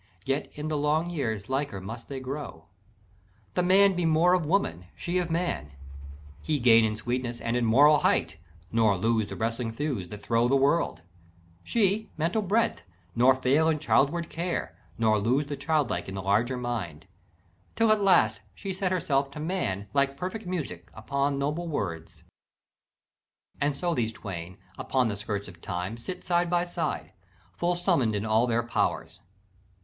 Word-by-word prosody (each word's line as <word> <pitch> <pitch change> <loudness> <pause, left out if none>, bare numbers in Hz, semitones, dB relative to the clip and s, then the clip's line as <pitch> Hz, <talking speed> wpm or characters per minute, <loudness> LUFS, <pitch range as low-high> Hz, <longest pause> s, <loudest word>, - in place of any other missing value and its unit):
Yet 135 +2 -1
in 150 +1 -4
the 155 -1 -1
long 155 +4 +1
years 110 - -2
liker 135 -6 -2
must 115 +5 -8
they 135 -1 -4
grow; 130 - -6 0.9
The - - +1
man 195 +2 +5
be 180 -1 -1
more 165 +2 +4
of 175 -4 +1
woman, 155 - 0
she 175 +1 -1
of 175 -2 -2
man; 165 - -2 0.7
He 155 -2 0
gain 115 -3 +6
in 110 -1 0
sweetness 120 +2 -3
and 115 +1 -2
in 125 -1 +1
moral 145 +6 +6
height, - - +1 0.3
Nor 110 -3 +3
lose 110 +1 +1
the - - -7
wrestling 115 +1 -2
thews 115 - -3
that 105 -1 -9
throw 115 +1 +2
the 135 - +3
world; 135 - +1 0.6
She 215 -1 +1
mental 170 +8 0
breadth, 210 +4 +1 0.3
nor 125 +2 +5
fail 140 +5 +2
in 160 - +2
childward 160 +2 +2
care, 175 +2 -3 0.2
Nor 110 -2 +3
lose 125 +8 +1
the 145 0 -4
childlike 140 -5 -1
in 95 - -6
the 95 - -4
larger 110 +6 +1
mind; 105 -11 -4 0.7
Till 225 -1 +3
at 215 -1 +3
last 195 -3 +4
she 195 -1 -5
set 185 0 -1
herself 140 -6 +1
to 140 - -9
man, 150 - -2
Like 140 0 +1
perfect 185 +4 -5
music 135 - -4
unto 140 +5 -1
noble 150 +5 -2
words; 85 - -4 1.4
And 140 0 +1
so 175 +1 0
these 115 -7 0
twain, 95 -4 -7 0.2
upon 130 -3 +1
the 105 - -2
skirts 100 -1 -4
of 90 -3 -13
Time, 90 +2 -4
Sit 150 +11 -7
side 175 -1 +1
by 175 0 +2
side, 175 - -3 0.4
full 175 +1 0
summ'd 170 - +1
in 105 +1 -2
all 110 +2 +3
their 120 0 +1
powers. 115 - -1
135 Hz, 170 wpm, -27 LUFS, 110-170 Hz, 1.4 s, gain